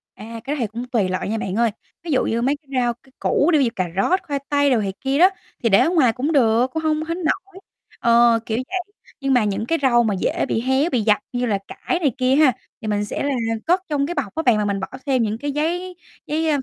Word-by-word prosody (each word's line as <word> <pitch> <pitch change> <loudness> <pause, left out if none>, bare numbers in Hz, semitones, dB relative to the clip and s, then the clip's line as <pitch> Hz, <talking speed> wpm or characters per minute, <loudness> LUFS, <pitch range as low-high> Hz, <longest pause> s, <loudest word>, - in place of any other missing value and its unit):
À, 225 +2 -8
cái 280 +4 -2
đó 290 - -6
thì 230 - 0
cũng 235 +4 -6
tùy 225 -7 0
loại 185 +1 -2
nha 220 - -1
bạn 195 -3 -3
ơi. 230 -1 +2 0.3
Ví 335 - -4
dụ 265 - +2
như 230 +1 -1
mấy 275 +4 +1
cái 290 - -38
rau, 240 -1 +1
cái 265 - -23
củ 300 - +2
đi, - - +6
ví 270 - +3
dụ - - +1
cà 185 -1 -1
rốt, 355 - +2
khoai 285 -5 -3
tây 285 -1 +3
đồ 240 - +3
này 195 -2 -2
kia 270 +1 0
đó, 365 +2 +7 0.3
thì 230 - +3
để 195 - +6
ở - - +3
ngoài 275 -10 +3
cũng 275 +5 -2
được, 240 -3 +3
cũng 320 - -1
không 310 0 +1
hến 335 +2 -3
nỗi. 380 +4 -2 0.4
Ờ, 235 0 +4
kiểu 220 - -2
vậy, 370 - -1 0.4
nhưng 275 -1 +1
mà 245 -3 +4
những 210 +1 -1
cái 330 +7 0
rau 240 -3 +4
mà 215 -3 0
dễ 185 - -1
bị 225 - -1
héo, 265 +6 +1
bị 250 -7 +1
dập 210 -1 +3 0.2
như 245 0 0
là 210 -4 +1
cải 350 - -3
này 295 -6 +2
kia 255 +1 +2
ha, 295 -3 +5 0.3
thì 215 - -6
mình 205 0 0
sẽ 205 - -4
là 285 - 0 0.3
cất 360 +2 +3
trong 285 -2 +1
cái 350 - -3
bọc 220 -9 -3
á 320 - -1
bạn 240 -5 +4
mà 210 - 0
mình 200 -1 -1
bỏ 190 - -4 0.2
thêm 260 -4 +2
những 215 0 -1
cái 285 +3 -3
giấy 350 +5 -2 0.3
giấy, 315 +2 0
a, 295 - +2
255 Hz, 280 wpm, -21 LUFS, 225-305 Hz, 0.4 s, đó